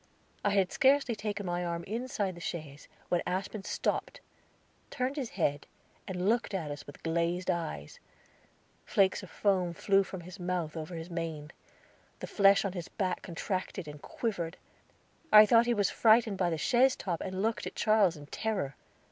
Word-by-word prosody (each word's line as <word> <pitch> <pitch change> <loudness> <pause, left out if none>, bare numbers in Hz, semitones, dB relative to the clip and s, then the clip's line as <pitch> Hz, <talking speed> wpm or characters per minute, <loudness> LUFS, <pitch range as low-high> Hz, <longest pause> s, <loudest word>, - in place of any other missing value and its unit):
I 205 - +3
had 195 -2 +2
scarcely 270 -3 +3
taken 210 -1 -4
my 175 0 -1
arm 170 -1 -3
inside 215 -2 -2
the 170 - -11
chaise 150 -4 -6 0.2
when 175 - +2
Aspen 195 +3 -3
stopped, - - -2 0.7
turned 255 +1 -2
his 270 -6 -3
head, 145 -5 -1 0.4
and 185 0 -2
looked 230 -2 +1
at 160 -6 -3
us 145 0 -8
with 145 - -12
glazed 170 +2 0
eyes; 155 - -4 0.8
flakes 195 -1 +2
of 190 - -10
foam 185 -2 +1
flew 195 +2 +3
from 190 -1 -6
his 180 +2 -11
mouth 175 -3 -2
over 160 +2 -5
his 165 +2 -7
mane. 160 -3 -4 0.7
The - - -5
flesh 200 0 +4
on 195 - -2
his 175 -3 -5
back 185 -2 -2
contracted 185 0 -4
and 150 -1 -9
quivered. 180 -7 -3 0.7
I 210 0 +10
thought 230 +2 +5
he 240 - +3
was 205 -2 +2
frightened 220 -3 +4
by 180 -2 +2
the 165 - -1
chaise 250 - +3
top, 175 -4 -3
and 190 +1 -3
looked 225 +1 -1
at - - -8
Charles 210 -6 +3
in 145 - -10
terror. 190 -4 -2
185 Hz, 175 wpm, -31 LUFS, 170-210 Hz, 0.8 s, I